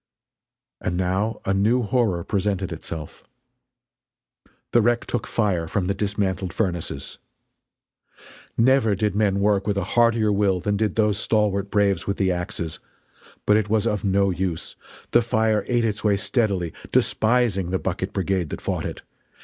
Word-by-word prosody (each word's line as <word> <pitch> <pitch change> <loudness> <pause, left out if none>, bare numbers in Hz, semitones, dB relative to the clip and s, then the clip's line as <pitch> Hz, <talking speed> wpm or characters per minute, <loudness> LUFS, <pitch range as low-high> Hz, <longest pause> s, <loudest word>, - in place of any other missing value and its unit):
And 90 -1 -2
now 95 +5 -1
a 95 - +1
new 110 +6 +2
horror 105 -7 +1
presented 100 -1 -1
itself. 80 -2 -7 1.5
The 120 - +5
wreck 120 +2 +1
took 120 - -3
fire 95 -7 0
from 95 +2 -1
the 100 - 0
dismantled 95 -3 -2
furnaces! 85 -9 -3 1.4
Never 115 -3 +4
did 105 0 0
men 100 -2 +2
work 100 -1 +2
with 100 -1 0
a 100 - 0
heartier 115 -2 +3
will 100 -2 +2
than 105 +3 -1
did 105 +1 0
those 105 -2 +2
stalwart 100 -2 +1
braves 100 -3 +1
with 100 - -1
the 95 -2 +2
axes. 90 -2 -4 0.7
But 105 - +5
it 105 -1 -1
was 110 -1 +2
of 105 -2 -1
no 100 -1 +2
use. 90 -2 -3 0.4
The 120 - +5
fire 110 -2 +1
ate 120 -2 +1
its 105 -1 -2
way 105 -2 +3
steadily, 100 -6 0 0.2
despising 110 -6 +2
the 95 - 0
bucket 95 +1 -3
brigade 95 -4 -1
that - - -5
fought - - -2
it. - - -8
100 Hz, 155 wpm, -23 LUFS, 95-110 Hz, 1.5 s, The